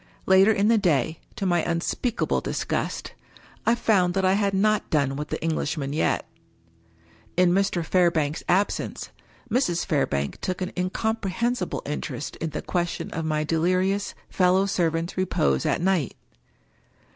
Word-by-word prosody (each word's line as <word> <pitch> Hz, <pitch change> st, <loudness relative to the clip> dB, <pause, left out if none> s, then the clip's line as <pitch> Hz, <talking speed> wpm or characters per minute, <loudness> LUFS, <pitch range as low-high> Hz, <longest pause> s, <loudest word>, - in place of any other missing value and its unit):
Later 190 Hz, +3 st, +6 dB
in 205 Hz, -1 st, +2 dB
the 225 Hz, -1 st, +4 dB
day, 160 Hz, -4 st, +1 dB, 0.2 s
to 195 Hz, -, -3 dB
my 175 Hz, -2 st, +2 dB
unspeakable 175 Hz, +9 st, -1 dB
dis -, -, -3 dB
gust, -, -, -3 dB, 0.5 s
I 230 Hz, -, +5 dB
found 190 Hz, -6 st, +2 dB
that 190 Hz, -1 st, +1 dB
I 185 Hz, -, +4 dB
had 200 Hz, -1 st, +1 dB
not 215 Hz, +1 st, +2 dB
done 140 Hz, -3 st, +1 dB
with 150 Hz, +1 st, -4 dB
the -, -, -3 dB
Englishman 150 Hz, -3 st, -1 dB
yet. 155 Hz, -, +1 dB, 1.1 s
In 180 Hz, -1 st, +5 dB
Mr. 190 Hz, -2 st, +1 dB
Fairbank's 165 Hz, -4 st, +2 dB
absence, 195 Hz, +3 st, 0 dB, 0.4 s
Mrs. 210 Hz, -8 st, +1 dB
Fairbank 70 Hz, -, -1 dB
took 185 Hz, -1 st, -2 dB
an 185 Hz, -1 st, -3 dB
incom 220 Hz, +5 st, -1 dB
prehensible 225 Hz, +1 st, -1 dB
interest 145 Hz, -1 st, -4 dB
in 165 Hz, -, -3 dB
the -, -, -5 dB
question 175 Hz, -1 st, -2 dB
of 165 Hz, 0 st, -3 dB
my 155 Hz, -1 st, 0 dB
delirious 185 Hz, +5 st, 0 dB
fellow 185 Hz, +1 st, +3 dB
servant's 170 Hz, -3 st, -1 dB
repose 70 Hz, -, +1 dB
at -, -, +1 dB
night. 175 Hz, -, +1 dB
180 Hz, 145 wpm, -25 LUFS, 160-195 Hz, 1.1 s, Later